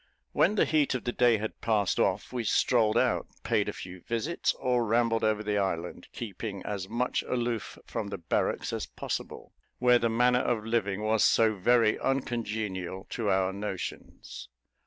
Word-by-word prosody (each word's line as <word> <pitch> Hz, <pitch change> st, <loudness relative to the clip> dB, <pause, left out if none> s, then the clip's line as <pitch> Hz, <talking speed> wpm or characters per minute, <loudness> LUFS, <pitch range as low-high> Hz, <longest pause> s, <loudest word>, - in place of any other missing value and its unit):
When 195 Hz, +6 st, +3 dB
the -, -, +4 dB
heat 150 Hz, -4 st, +2 dB
of 125 Hz, -, -3 dB
the 120 Hz, -, -1 dB
day 120 Hz, -2 st, +4 dB
had 110 Hz, +1 st, -6 dB
passed 105 Hz, -4 st, +1 dB
off, 100 Hz, +5 st, 0 dB
we 125 Hz, -2 st, -2 dB
strolled 110 Hz, 0 st, +3 dB
out, -, -, +1 dB, 0.2 s
paid -, -, +1 dB
a -, -, -1 dB
few 90 Hz, -1 st, -9 dB
visits, 120 Hz, -, -1 dB
or 125 Hz, -1 st, +1 dB
rambled 115 Hz, 0 st, +1 dB
over 110 Hz, -1 st, +1 dB
the 105 Hz, -1 st, 0 dB
island; 90 Hz, -3 st, -3 dB
keeping 100 Hz, -3 st, -6 dB
as 100 Hz, -2 st, -4 dB
much 120 Hz, +3 st, 0 dB
aloof 120 Hz, -3 st, -3 dB
from -, -, -4 dB
the 100 Hz, -, -5 dB
barracks 85 Hz, -, -1 dB
as -, -, -3 dB
possible, -, -, -6 dB, 0.2 s
where 125 Hz, -1 st, +5 dB
the 115 Hz, -, +1 dB
manner 125 Hz, +2 st, +3 dB
of 115 Hz, -3 st, -1 dB
living 105 Hz, -3 st, -1 dB
was 110 Hz, 0 st, +2 dB
so 110 Hz, -1 st, +4 dB
very 115 Hz, +2 st, +3 dB
uncongenial 110 Hz, -8 st, -2 dB
to 110 Hz, -4 st, -1 dB
our 95 Hz, 0 st, +2 dB
notions. 100 Hz, -9 st, -6 dB
110 Hz, 170 wpm, -29 LUFS, 100-120 Hz, 0.2 s, where